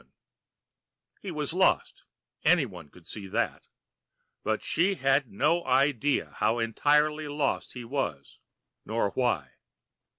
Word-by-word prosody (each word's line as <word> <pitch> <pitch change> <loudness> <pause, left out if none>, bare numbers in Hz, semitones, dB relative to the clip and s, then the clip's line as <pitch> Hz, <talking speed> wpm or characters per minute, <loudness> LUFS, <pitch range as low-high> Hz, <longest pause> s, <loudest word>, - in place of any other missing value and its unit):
] - - -48
He 200 - -6
was 150 -2 -3
lost 190 +1 +1 0.4
anyone 125 - +1
could 85 +3 -18
see 100 -3 -7
that 110 +5 -2 0.8
but 110 0 -1
she 190 +4 +1
had 135 -3 +1
no 155 - +2
idea 140 +1 +1
how 110 +2 +2
entirely 150 +6 +2
lost 145 -1 -1
he 125 -2 -7
was 115 - -4 0.4
nor 110 -2 -1
why! 90 - -1
135 Hz, 120 wpm, -28 LUFS, 110-150 Hz, 0.8 s, no